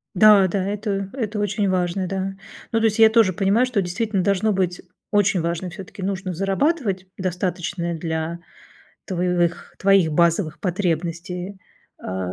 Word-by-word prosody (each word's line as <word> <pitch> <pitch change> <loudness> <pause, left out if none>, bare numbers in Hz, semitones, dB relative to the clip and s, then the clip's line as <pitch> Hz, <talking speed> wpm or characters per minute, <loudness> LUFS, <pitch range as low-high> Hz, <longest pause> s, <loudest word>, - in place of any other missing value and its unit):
Да, 205 0 +7
да, 190 +2 -1
это 200 -1 -2
это 220 -5 -3
очень 205 0 0
важно, 185 0 0
да, 195 +1 -3 0.4
ну 225 - +3
то 225 - +1
есть 220 0 +1
я 220 - +8
тоже 220 -4 +4
понимаю, 200 +6 +2
что 250 -5 0
действительно 190 +2 -1
должно 200 +3 +2
быть 185 -3 -1 0.3
очень 200 -2 +3
важно, 170 +2 -2
всё-таки 185 +2 -9
нужно 190 -1 -3
зарабатывать, 195 - 0
достаточное 180 -1 -2
для 160 +1 -3 0.7
твоевых 180 -2 -1
твоих 195 -4 +4
базовых 170 0 +2
потребностей, 180 +1 -2 0.5
а, 95 -1 -4
190 Hz, 140 wpm, -22 LUFS, 175-205 Hz, 0.7 s, я